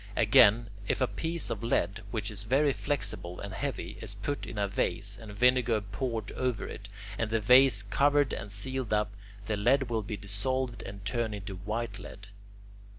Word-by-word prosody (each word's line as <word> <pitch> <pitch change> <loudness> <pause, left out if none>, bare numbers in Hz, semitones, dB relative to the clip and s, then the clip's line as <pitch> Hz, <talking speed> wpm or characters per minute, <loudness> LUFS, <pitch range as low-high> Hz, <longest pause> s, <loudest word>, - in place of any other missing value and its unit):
Again, 110 +1 +5 0.2
if - - +1
a 130 - +4
piece 165 +5 -3
of 110 - -3
lead, 115 -2 0
which 105 -1 -3
is 105 +1 -4
very 140 +4 +3
flexible 90 -12 -3
and 100 -1 -6
heavy, - - -4
is - - -6
put 145 0 -3
in - - -7
a 100 -1 +1
vase 100 0 -1
and 110 -2 -9
vinegar 120 0 +3
poured 110 +3 -3
over 125 -4 -1
it, 100 - -8 0.3
and 115 - 0
the 115 0 +1
vase 125 -1 +6
covered 140 +5 +3
and 100 - -5
sealed 130 +3 -3
up, 105 0 +1 0.3
the 110 - -1
lead 120 +4 +2
will 110 -1 +1
be 105 0 -5
dissolved 120 +6 -1
and 100 0 -8
turn 115 0 -1
into 100 -1 -6
white 105 +2 -3
lead. 100 0 -10
110 Hz, 180 wpm, -30 LUFS, 100-130 Hz, 0.3 s, vase